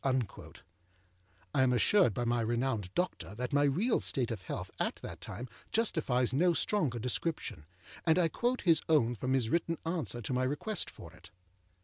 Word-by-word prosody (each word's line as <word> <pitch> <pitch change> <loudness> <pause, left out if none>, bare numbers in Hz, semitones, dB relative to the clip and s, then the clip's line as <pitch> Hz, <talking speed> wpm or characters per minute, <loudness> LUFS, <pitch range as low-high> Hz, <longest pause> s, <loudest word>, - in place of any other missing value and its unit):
â 130 -6 -2 1.0
I 130 - +3
am 130 -1 +4
assured 125 - +4
by 120 - -1
my 120 0 +1
renowned 115 -4 -1
doctor 180 - -2
that 125 +3 -4
my 145 0 +4
real 185 - +2
state 125 -3 0
of 115 - -4
health - - -5
at - - 0
that - - -7
time 125 - -6 0.2
justifies 145 - +1
no 170 +5 +3
stronger 155 - +1
description, 125 - -3 0.4
and 160 0 +3
I 175 -2 +4
quote 245 +9 -1
his 165 -4 +5
own 125 -7 +4
from 130 +3 -2
his 125 -4 +2
written 165 -1 +1
answer 160 -7 -1
to 120 - -3
my 125 - +1
request 150 +11 -1
for 85 0 -12
it. 90 0 -16
130 Hz, 175 wpm, -32 LUFS, 120-165 Hz, 1.0 s, his